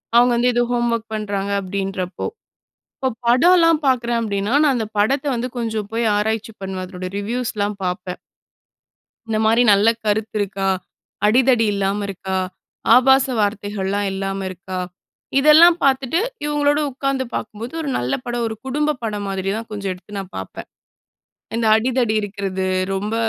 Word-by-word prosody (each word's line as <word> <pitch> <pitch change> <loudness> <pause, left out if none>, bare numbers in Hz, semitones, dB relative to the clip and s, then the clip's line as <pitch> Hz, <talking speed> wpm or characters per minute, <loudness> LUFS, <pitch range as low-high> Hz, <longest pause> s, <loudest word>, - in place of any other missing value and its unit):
அவுங்க 240 +1 +6
வந்து 245 +1 +3
ஏதோ 240 0 +2
ஹோம்வொர்க் 235 -2 0
பண்றாங்க 200 -2 -2
அப்டின்றப்போ, 190 -1 -3 0.7
இப்போ 265 - 0 0.2
படம்லாம் 330 +5 +5
பாக்குறேன் 240 -2 +1
அப்டின்னா, 205 0 -2
நான் 285 -3 +3
அந்த 225 -2 -2
படத்தை 270 +7 +2
வந்து 240 +2 -2
கொஞ்சம் 220 -3 -2
போய் 230 +1 0
ஆராய்ச்சி 220 +1 -1
பண்ணுவேன், 190 -1 -4
அதனுடைய 185 0 -7
ரிவ்யூஸ்லாம் 210 -2 -2
பாப்பேன். 180 0 -3 1.1
இந்த 220 -1 0
மாரி 230 +2 +4
நல்ல 200 +2 +4 0.2
கருத்து 215 +1 -1
இருக்கா? 195 -1 -1 0.6
அடிதடி 240 +1 +4
இல்லாம 200 +1 -1
இருக்கா? 190 0 -4 0.6
ஆபாச 265 +2 +5
வார்த்தைகள்லாம் 205 -1 -1
இல்லாம 195 0 -3
இருக்கா? 185 0 -6 0.6
இதெல்லாம் 315 +4 +7
பாத்துட்டு 270 +3 +2 0.3
இவுங்களோடு 295 0 +2
உக்காந்து 275 0 -1
பாக்கும்போது, 220 +3 -5
ஒரு 300 - -4
நல்ல 125 +2 -1
படம், 240 -1 -2
ஒரு 220 - -5
குடும்ப 300 +3 0
படம் 210 -2 -3
மாதிரி 195 0 -3
தான் 230 +1 -6
கொஞ்சம் 200 -2 -3
எடுத்து 185 +3 -10
நான் 190 -2 -7
பாப்பேன். 95 - -7 0.9
இந்த 230 0 0
அடிதடி 245 -1 +1
இருக்கிறது, 195 -2 -3 0.3
ரொம்ப 205 +3 -2
220 Hz, 140 wpm, -20 LUFS, 195-250 Hz, 1.1 s, இதெல்லாம்